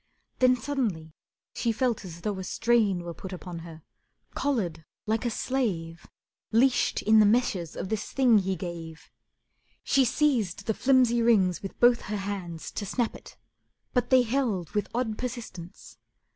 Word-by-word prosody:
Then 255 0 +5
suddenly 225 - -3 0.4
she 235 - 0
felt 235 -2 0
as 170 -2 -9
though 205 -1 -2
a - - -4
strain 210 -3 +1
Were 170 0 -6
put 190 +3 -9
upon 180 -2 -7
her, 165 -2 -11 0.5
collared 185 - -1 0.2
like 220 +2 -1
a - - +2
slave, 195 -10 -2 0.4
Leashed 245 +3 +2
in 220 +1 +5
the 215 - +7
meshes 205 -7 +1
of 190 - -5
this 215 -1 -3
thing 250 -5 +4
he 190 0 -1
gave. 165 -2 -8 0.7
She 275 - +3
seized 245 - +1
the 220 - +1
flimsy 250 -1 +3
rings 195 -7 +3
with 195 - -8
both 240 0 +5
her 210 - -1
hands 190 -5 -5
To - - -4
snap 235 +3 -1
it, - - -13 0.6
but 250 - +1
they 255 -1 +6
held 225 - -1
with 210 - -1
odd 230 -3 -1
persistence. 220 -8 -7
215 Hz, 160 wpm, -27 LUFS, 180-245 Hz, 0.7 s, the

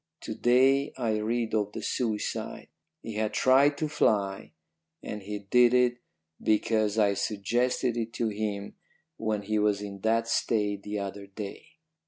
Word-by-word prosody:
"To - - -5
day 135 +3 +3
I 115 -4 0
read 115 +1 -1
of 105 -1 0
the - - -6
suicide. 110 -4 -3 0.3
He 115 - -6
had 110 -1 -1
tried 140 +3 +4
to 155 - -1
fly 100 - 0 0.5
and 105 - -5
he 105 +2 -5
did 125 0 +6
it 125 -1 +3 0.4
because 110 0 +1
I 105 -2 +4
suggested 120 +5 0
it 115 -1 -3
to 115 -2 -1
him 105 -1 -3 0.4
when 110 -2 -2
he 105 +1 0
was 105 -1 +2
in 100 -1 -7
that 115 +3 +1
state 105 -3 0
the 105 +1 -4
other 100 0 -5
day. 100 0 -8
110 Hz, 155 wpm, -28 LUFS, 105-120 Hz, 0.5 s, did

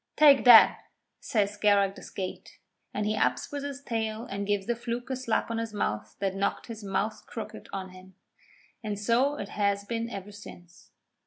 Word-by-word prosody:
'Take 285 -3 +6
that,' 235 -3 +8 0.3
says 205 -3 0
Scarrag 205 -1 +3
the - - -12
Skate, 185 -2 -7 0.3
and 210 - -2
he 215 +1 0
ups 125 -7 0
with 285 -1 -4
his 280 -1 -6
tail 225 -2 -3
and 200 -4 -4
gives 205 -2 0
the 240 - 0
Fluke 240 +2 -5
a - - 0
slap 235 -2 -1
on 230 - -1
his 225 -2 -4
mouth 105 - -2
that 195 -1 -1
knocked 195 +1 -1
his 225 -2 -8
mouth 205 +2 -2
crooked 225 - -8
on 190 -1 -5
him. 185 0 -15 0.7
And 210 -2 -3
so 240 +7 +2
it 200 -9 -6
has 200 -1 0
been 230 +2 -3
ever 200 -1 -7
since. 180 -4 -13
210 Hz, 185 wpm, -28 LUFS, 195-235 Hz, 0.7 s, that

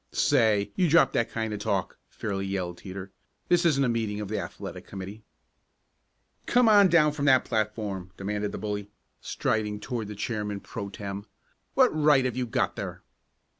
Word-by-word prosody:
"Say, 110 -7 +3
you 180 -3 +2
drop 165 +2 +5
that 115 - 0
kind 110 -1 -3
of 105 - -4
talk!" - - -2
fairly 95 -2 -3
yelled 90 -3 -3
Teeter. 95 0 -8 0.4
"This 175 -1 +4
isn't 140 -4 +3
a - - +2
meeting 110 -3 -1
of 105 -2 -5
the 110 - -1
athletic - - -7
committee!" 100 +2 -7 1.3
"Come 245 -1 +4
on 205 -2 +7
down 165 -3 +5
off 150 - -7
that 140 -3 +4
platform!" 105 -4 -2
demanded 105 +1 -2
the - - -5
bully 105 -1 -4 0.3
striding 105 -1 -1
toward 115 -2 -4
the 105 - -7
chairman 105 -1 -3
pro 100 -1 -6
tem. 100 0 -6 0.5
"What 260 -2 +6
right 150 -4 +4
have 125 - -1
you 125 -1 -1
got - - 0
there?" - - -6
110 Hz, 170 wpm, -27 LUFS, 100-135 Hz, 1.3 s, on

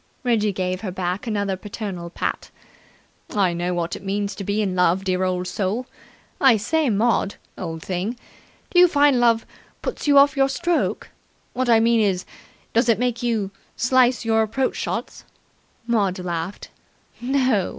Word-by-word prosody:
Reggie 220 -4 +2
gave 185 -1 -2
her 210 - -4
back 185 +4 -3
another 200 -3 -1
paternal 190 -3 -6
pat. - - -3 0.9
"I 190 -4 +2
know 175 +1 -2
what 170 0 -2
it - - -10
means 200 +1 -2
to 200 - -7
be 205 +2 -1
in 195 -4 0
love, 180 +1 +2
dear 185 -1 0
old 180 -1 -1
soul. 205 +6 -2 0.5
I 265 -5 +6
say, 305 +7 0
Maud, 215 -1 +1 0.2
old 165 -1 -6
thing, 190 +6 -3 0.5
do 355 - +4
you 360 - +8
find 285 -5 +4
love 230 -2 +3 0.4
puts - - -4
you 285 -1 +5
off 280 0 +6
your 270 -1 +3
stroke? 345 +5 -1 0.4
What 255 -1 -1
I 230 -1 +6
mean 230 +1 +3
is, 195 -4 +1 0.5
does 230 +1 +3
it 225 - +4
make 245 0 -1
you 225 -5 -1 0.2
slice 250 -1 +3
your 225 0 +3
approach 230 +5 0
shots?" - - -4 0.6
Maud 205 -5 +1
laughed. 175 0 -5 0.5
"No. 255 -6 +1
210 Hz, 160 wpm, -22 LUFS, 185-245 Hz, 0.9 s, you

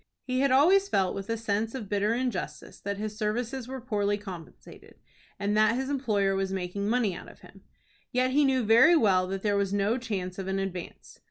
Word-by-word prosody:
He 255 -1 -2
had 275 +1 +3
always 365 +10 +4
felt 190 - +1
with 195 +1 -6
a 230 - 0
sense 220 +1 -2
of 230 -6 -5
bitter 205 +3 +1
injustice 245 -6 -4
that 200 0 -4
his 210 0 -4
services 235 +4 -2
were 265 0 -6
poorly 205 -4 -1
compensated, 185 -5 -11 0.4
and 205 +1 -1
that 215 +1 +4
his 265 +2 -2
employer 210 -8 +1
was 195 0 -1
making 195 +2 -3
money 230 -5 +1
out - - -9
of - - -17
him. - - -16 0.5
Yet 255 +1 +1
he 290 +3 +4
knew 265 -2 +2
very 235 +11 +6
well 190 - +3
that 195 0 -4
there 205 -1 +1
was 200 -1 0
no 205 +5 +1
chance 195 -6 -4
of 190 - -5
an 190 0 -1
advance. 190 -2 -6
210 Hz, 205 wpm, -28 LUFS, 195-255 Hz, 0.5 s, very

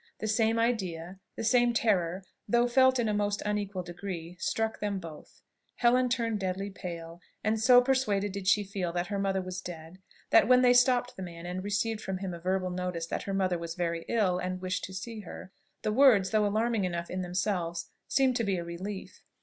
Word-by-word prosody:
The - - -5
same 225 +1 +2
idea, 190 -6 -1 0.2
the - - -4
same 240 +1 +3
terror, 190 -5 +1 0.2
though 240 +3 +3
felt 260 +1 +4
in 240 -2 +1
a 210 - +1
most 205 0 0
unequal 205 -3 -2
degree, 175 -1 -6
struck 220 +4 -1
them 205 -1 -1
both. 165 -4 -11 0.3
Helen 250 +1 +3
turned 230 -3 0
deadly 195 +1 -3
pale; 170 -2 -8 0.2
and 220 0 +1
so 245 +1 +7
persuaded 215 -7 +1
did 195 -1 -6
she 205 +1 +4
feel 190 -3 -3
that 175 +1 -2
her 200 - -1
mother 195 -1 0
was 185 0 -5
dead, 170 0 -9 0.3
that - - +6
when 255 0 +6
they 245 0 +6
stopped 245 0 +3
the - - -8
man 170 -2 -8
and 180 +1 -4
received 210 +2 -1
from 190 -2 -3
him 185 -1 -4
a 170 - -7
verbal 185 +1 -1
notice 180 -2 -3
that - - -3
her - - -1
mother 185 -3 +1
was 170 0 -5
very 170 -2 -2
ill 195 -6 +2
and 185 0 -3
wished 185 0 -3
to 190 - -10
see 220 +4 -6
her, 185 -1 -9 0.3
the 215 - 0
words, 225 -7 +5
though 215 -1 +3
alarming 220 +1 +1
enough 170 -2 -3
in 185 - -2
themselves, 180 -2 -2 0.2
seemed 265 -2 +2
to 230 - 0
be 195 -3 0
a 170 - -3
relief. 185 +4 -7
195 Hz, 205 wpm, -29 LUFS, 180-225 Hz, 0.3 s, so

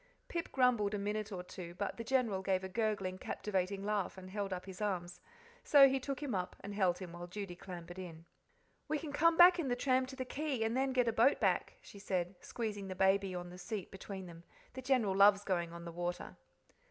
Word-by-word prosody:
Pip 335 -1 -3
grumbled 240 -6 +3
a - - -1
minute 210 +1 -2
or 180 -2 -5
two, 175 -1 -9
but 195 +1 -3
the 230 - -4
General 230 -6 +1
gave 190 -1 0
a - - -3
gurgling, 200 -3 -1
captivating 195 0 -2
laugh 205 -2 -1
and 185 0 -10
held 200 -1 -3
up 185 -1 -4
his 190 0 -9
arms, 180 -4 -2 0.4
so 280 -2 +8
he 270 0 +1
took 275 +2 -4
him 275 -5 -2
up 180 -1 -2
and 200 - -6
held 185 -4 +2
him 180 -3 -8
while 175 0 -7
Judy 195 -1 -6
clambered 175 0 -9
in. 165 -3 -8 0.6
"We 310 - 0
can 290 -1 -6
come 330 +2 +4
back 355 0 +8
in 315 - -1
the 245 - +1
tram 255 0 +2
to 265 - -8
the 260 -1 -4
Quay, 275 -3 -2
and 225 +1 0
then 265 +1 +1
get 250 -2 +2
a 230 - +2
boat 235 +6 +4
back," - - +1
she 200 - -12
said, 185 -2 -2
squeezing 210 -4 -4
the 185 - -5
baby 190 0 +2
on 175 0 -6
the 180 - -10
seat 205 +1 -5
between 190 0 -7
them. 170 -1 -11 0.3
"The 260 - -6
General 250 -7 +2
loves 200 +1 +6
going 175 -4 -1
on 170 0 -8
the 170 - -6
water." 175 +1 -4
200 Hz, 225 wpm, -35 LUFS, 185-250 Hz, 0.6 s, so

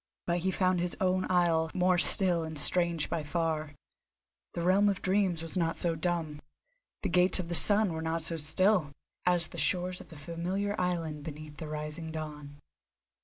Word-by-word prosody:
But 175 0 -1
he 185 +2 -2
found 185 -1 0
his 175 0 -3
own 185 -1 0
isle 170 -3 +1
more 180 -1 +2
still 175 -3 +3
and 160 -1 -7
strange 170 +1 +2
by 170 - -3
far. 155 -1 -3 0.8
The 170 - -4
realm 195 +3 +3
of 195 - -3
Dreams 185 -4 0
was 165 - -5
not 165 -3 -1
so 170 -2 0
dumb, 160 -3 -3 0.6
the - - -1
Gates 180 +1 +3
of 175 -2 -5
the - - -3
Sun 205 +2 +8
were 160 - -5
not 160 0 -2
so 165 - 0
still, 160 +1 +1 0.3
as 175 -2 +3
the - - -7
shores 180 0 0
of - - -15
the 160 - -13
familiar 175 +7 -4
island 165 -4 -3
beneath 150 0 -10
the 160 - -7
rising 150 +2 -6
dawn. 150 -2 -8
170 Hz, 180 wpm, -29 LUFS, 160-185 Hz, 0.8 s, Sun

